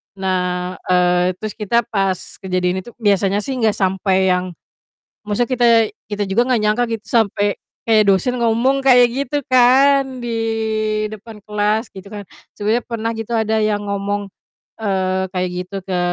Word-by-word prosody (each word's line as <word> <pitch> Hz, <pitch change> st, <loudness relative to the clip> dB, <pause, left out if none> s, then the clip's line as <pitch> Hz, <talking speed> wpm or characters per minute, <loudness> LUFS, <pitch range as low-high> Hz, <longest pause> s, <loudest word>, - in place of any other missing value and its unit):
Nah, 180 Hz, -1 st, -2 dB
eee, 180 Hz, 0 st, +2 dB
terus 215 Hz, -1 st, -4 dB
kita 235 Hz, +3 st, +1 dB
pas 195 Hz, -4 st, 0 dB, 0.2 s
kejadian 185 Hz, -1 st, -1 dB
itu 240 Hz, -, -13 dB
biasanya 205 Hz, -1 st, +1 dB
sih 275 Hz, -, -4 dB
nggak 220 Hz, -3 st, +2 dB
sampai 190 Hz, 0 st, +1 dB
yang 180 Hz, 0 st, -1 dB, 0.8 s
maksudnya 235 Hz, +4 st, 0 dB
kita 240 Hz, 0 st, +3 dB, 0.4 s
kita 205 Hz, 0 st, -2 dB
juga 235 Hz, +6 st, +1 dB
nggak 235 Hz, -, +2 dB
nyangka 215 Hz, +3 st, +2 dB
gitu 220 Hz, -2 st, -4 dB
sampai 205 Hz, -3 st, +1 dB, 0.3 s
kayak 220 Hz, -2 st, +4 dB
dosen 200 Hz, +6 st, +2 dB
ngomong 235 Hz, +4 st, +2 dB
kayak 250 Hz, -2 st, +6 dB
gitu 280 Hz, +2 st, -2 dB
kan, 260 Hz, +1 st, +4 dB
di 240 Hz, -, -3 dB, 0.8 s
depan 215 Hz, 0 st, -10 dB
kelas, 210 Hz, +2 st, 0 dB
gitu 195 Hz, 0 st, -11 dB
kan. 205 Hz, -1 st, -7 dB, 0.3 s
Sebenernya 220 Hz, +3 st, 0 dB
pernah 230 Hz, -1 st, -2 dB
gitu 225 Hz, +1 st, -5 dB
ada 220 Hz, -1 st, +1 dB
yang 210 Hz, -1 st, 0 dB
ngomong, 200 Hz, 0 st, -2 dB, 0.5 s
eee, 190 Hz, -2 st, 0 dB
kayak 185 Hz, -1 st, -1 dB
gitu 180 Hz, +2 st, -5 dB
ke 185 Hz, -2 st, -2 dB
210 Hz, 155 wpm, -19 LUFS, 190-235 Hz, 0.8 s, kayak